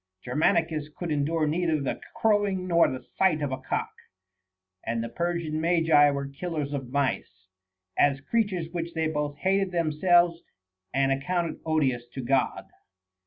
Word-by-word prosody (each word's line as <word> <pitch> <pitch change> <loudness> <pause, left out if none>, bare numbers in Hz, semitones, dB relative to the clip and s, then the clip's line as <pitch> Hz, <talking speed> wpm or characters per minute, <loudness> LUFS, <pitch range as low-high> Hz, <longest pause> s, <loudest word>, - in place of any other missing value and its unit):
Germanicus 155 +3 +1
could 175 -3 -4
endure 155 +2 +1
neither 160 0 +1
the 140 - -3
crowing 205 -4 +1
nor 170 -1 +5
the 130 -1 -6 0.2
sight 185 -5 +4
of 140 - -1
a 130 - -3
cock; 130 - -3 0.9
and 115 0 -2
the 115 - -4
Per 170 +7 -1
sian 155 -2 -3
Magi 165 -3 +5
were 140 -1 -2
killers 145 0 -4
of 135 -3 -4
mice, 130 -9 -2 0.5
as 140 -1 +4
creatures 190 0 -1
which 170 -1 -4
they 160 0 0
both 150 -2 -2
hated 195 +2 +1
themselves 170 +1 +3 0.5
and 135 +1 +2
accounted 165 +5 -1
odious 135 -7 +1
to 130 - -3
God. 130 +1 0
155 Hz, 150 wpm, -27 LUFS, 140-175 Hz, 0.9 s, nor